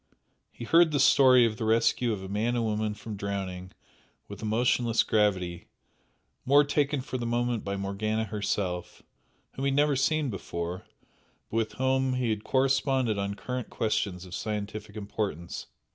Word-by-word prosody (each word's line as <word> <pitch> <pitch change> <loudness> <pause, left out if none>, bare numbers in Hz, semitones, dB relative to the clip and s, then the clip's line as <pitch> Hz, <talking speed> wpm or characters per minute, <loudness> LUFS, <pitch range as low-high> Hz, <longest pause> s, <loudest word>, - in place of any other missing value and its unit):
He 120 - -8
heard 165 +6 +5
the 145 -2 0
story 130 -2 +6
of 110 -2 -1
the 115 - -4
rescue 115 +2 +2
of 100 -3 -4
a - - -6
man 110 +5 -1
and 120 - 0
woman 105 -1 -1
from 105 0 -7
drowning 95 -2 -4 0.6
with - - -9
emotionless 115 +1 +2
gravity, 95 -5 0 0.8
more 145 +2 +5
taken 145 -1 0
for 130 -1 -5
the 120 - -3
moment 120 -1 0
by 100 0 -3
Morgana 105 +3 -1
herself, 100 -4 -3 0.5
whom 135 - -4
he - - +3
had 135 - 0
never 145 0 +3
seen 145 0 +1
before, 90 -2 -5 0.6
but 115 - -1
with 110 -1 0
whom 130 0 +1
he 125 -3 0
had 105 -1 -3
corresponded 130 -4 +1
on 100 0 -2
current 125 +5 -5
questions 100 -4 -1
of 90 - -11
scientific 105 0 -4
importance. 100 -5 -4
110 Hz, 160 wpm, -28 LUFS, 100-130 Hz, 0.8 s, story